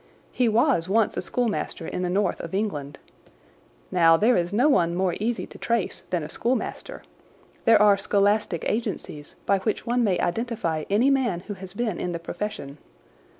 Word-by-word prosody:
He 245 -2 +1
was 225 - +2
once 220 +1 +2
a - - -2
schoolmaster 225 -8 -2
in - - -4
the 180 - -1
north 200 +3 0
of - - -6
England. 145 -9 -3 0.9
Now, 165 0 +5
there 235 +7 +3
is 175 0 0
no 240 +8 +3
one 175 - +3
more 185 -1 +1
easy 230 +3 -1
to - - -14
trace 230 -4 -1
than 175 -3 -1
a - - -5
schoolmaster. 240 +6 -3 0.6
There 225 - +6
are 205 -1 +5
scholastic 200 -2 +1
agencies 205 -9 -4
by 200 -1 +2
which 215 +2 -2
one 240 +1 +1
may 195 -5 +2
identify 175 -6 -2
any 230 +8 +3
man 245 -10 +1
who 205 - -7
has 190 -1 -11
been 220 -5 -2
in 175 - -3
the - - -2
profession. 165 -5 -6
200 Hz, 175 wpm, -25 LUFS, 175-230 Hz, 0.9 s, There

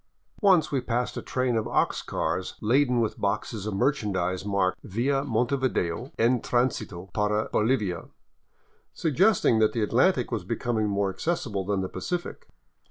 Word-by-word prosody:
Once 185 -6 +4
we 135 -3 0
passed 120 +1 -2
a - - -4
train 130 -2 -1
of 110 - 0
ox - - +1
cars - - -2
laden 125 +2 +2
with 110 - -2
boxes 100 +1 -2
of 105 - -2
merchandise 95 -7 0
marked 100 -2 0
" - - -45
Via 135 +3 +2
Montevideo 125 -4 -1
en 120 +1 +3
transito 105 -7 -1
para 105 +1 0
Bolivia,*' 105 -7 0 0.9
suggesting 165 - +3
that 110 -1 +3
the 115 - 0
Atlantic 125 - +2
was 110 -5 -2
becoming 110 +2 -1
more 100 -1 0
accessible 120 - -2
than 100 -2 0
the 95 - -2
Pacific. 175 - -5
115 Hz, 150 wpm, -26 LUFS, 100-130 Hz, 0.9 s, Once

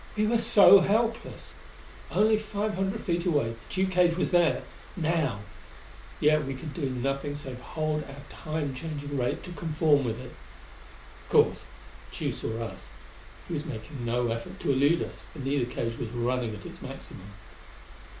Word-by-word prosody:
We 215 - +3
were 230 +2 +3
so 210 -3 +8
helpless! 225 +4 0 0.6
Only 215 +1 +4
five 215 0 -2
hundred 195 +3 -1
feet 170 -2 0
away, 145 -10 +1 0.2
the 190 +1 +1
Tugh 190 - -3
cage 175 -2 +4
was 185 - 0
there 175 -2 +3 0.3
now; 155 - 0 0.8
yet 155 0 +4
we 135 0 -4
could 145 +3 -7
do 145 -6 -2
nothing 135 +3 -2
save 135 -4 -7
hold 155 +2 -2
our 140 0 -10
Time 155 -3 -3
changing 145 0 -5
rate 125 -2 -1
to 180 - -8
conform 155 -4 +2
with 115 -1 -2
it. 125 -1 -9 0.9
Of - - -19
course - - +4 0.5
Tugh - - -2
saw 115 +1 -3
us. 115 - -9 0.5
He 175 - -5
was 150 -2 -2
making 120 0 -6
no 120 0 0
effort 115 0 -5
to - - +1
elude 145 +5 +3
us, - - -8
for - - -12
neither 135 -3 0
cage 115 0 -3
was 115 - -3
running 120 -1 -1
at 100 - -11
its - - -10
maximum. 100 +2 -9
145 Hz, 170 wpm, -28 LUFS, 125-175 Hz, 0.9 s, so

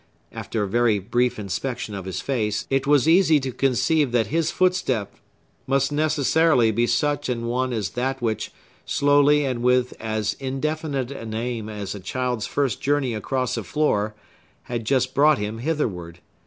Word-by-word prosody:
After 110 - -3
a - - -2
very 115 +1 +2
brief 120 +6 0
inspection 110 +2 -4
of 95 -2 -6
his 95 - -4
face, 110 -6 -1
it 135 0 +1
was 145 -1 +4
easy 165 -2 +5
to 130 -1 -3
conceive 135 +3 +1
that 115 -2 +3
his 165 -1 +1
footstep 135 - 0 0.5
must 135 +1 +1
necessarily 150 -4 +3
be 120 +2 +1
such 145 0 0
an 115 -2 -2
one 125 +2 -1
as 105 -5 -2
that 130 +2 -2
which, 110 -4 -2 0.3
slowly 145 +1 +3
and 125 -3 -2
with 125 0 +2
as 110 -1 -1
indefinite 140 0 -2
an 115 -5 -6
aim 115 -1 -3
as 105 -3 -5
a 100 - -7
child's 125 +4 -2
first 140 -4 -1
journey 140 -3 +1
across 125 +3 -2
a - - -3
floor, 105 -9 0 0.5
had 120 -2 -4
just 130 +1 +1
brought 150 +1 +5
him 105 +2 -4
hitherward. 105 - -2
125 Hz, 165 wpm, -23 LUFS, 110-145 Hz, 0.5 s, easy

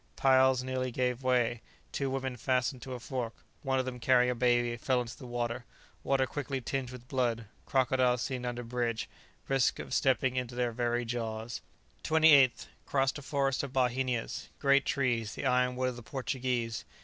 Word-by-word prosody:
Piles 130 -1 +4
nearly 130 0 -2
gave 125 0 -1
way; 120 -3 +1 0.3
two 140 -1 -1
women 130 -1 -2
fastened 125 +1 0
to 130 -1 -6
a - - -7
fork; 120 -2 -4 0.3
one 135 -1 0
of 130 - 0
them, 125 -1 -5
carrying 125 +1 +4
a - - 0
baby, 120 -1 +2
fell 125 +1 +1
into 120 -1 -5
the 130 - -10
water. 120 0 -2 0.4
Water 135 -1 +2
quickly 135 0 -3
tinged 130 0 -3
with 125 -1 -11
blood; 120 -4 0 0.2
crocodiles 125 -2 +2
seen 125 -1 -3
under 120 0 -3
bridge; 115 -1 -2 0.4
risk 135 -2 +2
of - - -6
stepping 130 -1 +2
into 125 -1 -3
their 120 -1 0
very 120 +1 -1
jaws. 115 -1 -4 0.4
28th. 155 -5 +5 0.2
Crossed 135 +1 +1
a - - -10
forest 135 -1 0
of 140 -2 -6
bauhinias; 125 -2 0
great 140 -1 +3
trees, 120 -5 0
the - - -5
iron 125 -1 +2
wood 130 0 0
of 125 - -7
the - - -8
Portuguese. 125 -2 -2
125 Hz, 175 wpm, -31 LUFS, 120-130 Hz, 0.4 s, 28th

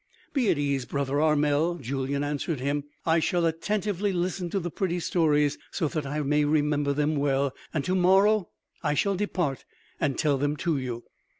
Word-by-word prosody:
"Be 250 -7 +2
at - - +3
ease, 140 -3 0
brother 140 +2 -1
Armel," 150 +2 +2
Julyan 140 0 -2
answered 145 +1 -2
him; 140 +2 -1 0.2
"I 165 0 +4
shall 170 +1 +1
attentively 200 +4 -1
listen 180 0 -2
to 195 - -1
the 175 -2 -4
pretty 180 -1 -1
stories 150 -4 +2
so 165 - -1
that 155 -3 -3
I 150 +2 -2
may 150 +1 +2
remember 145 -1 +1
them 150 +2 +1
well; 140 -1 +1 0.2
and 150 -3 -2
to 185 - 0
morrow... 190 +2 +4 0.3
I 150 -1 0
shall 200 +6 +2
depart 180 -8 -1 0.4
and 145 -5 0
tell 145 -3 +2
them 145 +2 0
to 165 -4 0
you.... 120 -2 -5
150 Hz, 180 wpm, -27 LUFS, 140-175 Hz, 0.4 s, I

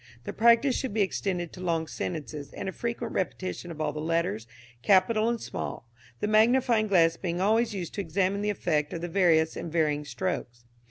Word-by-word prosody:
The - - -5
practice 235 +4 +4
should 255 -6 -3
be 215 - +4
extended 180 -3 -2
to 185 - -9
long 165 -3 0
sentences, 150 -3 -5
and - - -5
a - - -1
frequent 235 +4 -4
repetition 185 -1 -3
of 160 -2 -8
all 150 -1 -1
the 150 - -5
letters, 165 -8 -1 0.3
capital 215 - +3
and 235 -1 -1
small, - - -5 0.4
the - - 0
magnifying 220 +1 +4
glass 165 -4 +4
being 175 -1 -3
always 220 +3 +2
used 175 -4 -5
to 200 - -2
examine 195 +3 0
the 210 - 0
effect 155 -7 -1
of 165 - -4
the 175 - -3
various 165 -3 +3
and 170 - -5
varying 150 -3 +1
strokes. 120 -9 -4
180 Hz, 195 wpm, -28 LUFS, 160-210 Hz, 0.4 s, practice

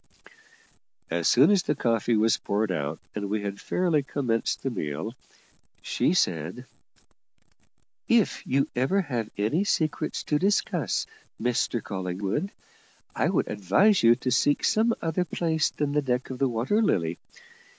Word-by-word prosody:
As - - 0
soon - - +6
as 200 -3 +4
the 150 - -1
coffee 115 -2 +1
was 110 0 +3
poured 105 0 -1
out, 75 -2 -3
and 100 -1 -4
we 105 0 -1
had 100 -1 -5
fairly 170 -5 +1
commenced 125 -5 -2
the 135 - -1
meal, 80 +1 -4 0.7
she 175 - +1
said: 90 - -1 1.4
"If - - +2
you 140 +1 +2
ever 135 +11 +2
have 120 - -3
any 110 - +1
secrets 155 -5 -1
to 150 - 0
discuss, 200 +4 0 0.3
Mr 120 -1 0
Collingwood, 95 - -3 0.6
I - - +1
would - - +1
advise 105 - +3
you 115 0 +6
to 130 +1 -3
seek 145 +4 +2
some 225 +2 +2
other 165 +2 0
place 160 -2 0
than 145 -1 -2
the 150 +1 +1
deck 125 -1 -2
of 130 - -6
the 135 -1 +2
Water 125 - +1
Lily. 85 - 0
125 Hz, 145 wpm, -26 LUFS, 105-155 Hz, 1.4 s, soon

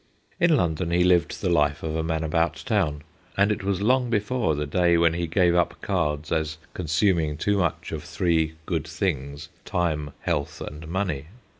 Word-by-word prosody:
In 170 -3 +4
London 85 - 0
he 90 +1 +3
lived 90 -3 +2
the - - +2
life 75 -3 +2
of 80 -1 -2
a 80 - 0
man 80 0 -1
about 80 +1 0
town, 85 - 0 0.3
and 100 +2 +4
it 105 - -2
was 100 0 -1
long 125 +2 +3
before 110 -5 0
the 75 +1 -2
day 85 +3 +3
when 85 -1 +4
he 85 0 -2
gave 85 +1 +3
up 90 0 +1
cards 75 -6 -1
as 80 -1 -1 0.2
consuming 80 -2 +1
too 100 +5 +1
much 85 -4 -1
of - - -4
three 80 -3 0
good 80 -2 -2
things, 75 -3 -3
time, 80 -6 -1
health, 70 -2 -2
and 75 +2 -7
money. 85 -5 -2
85 Hz, 180 wpm, -25 LUFS, 75-95 Hz, 0.3 s, In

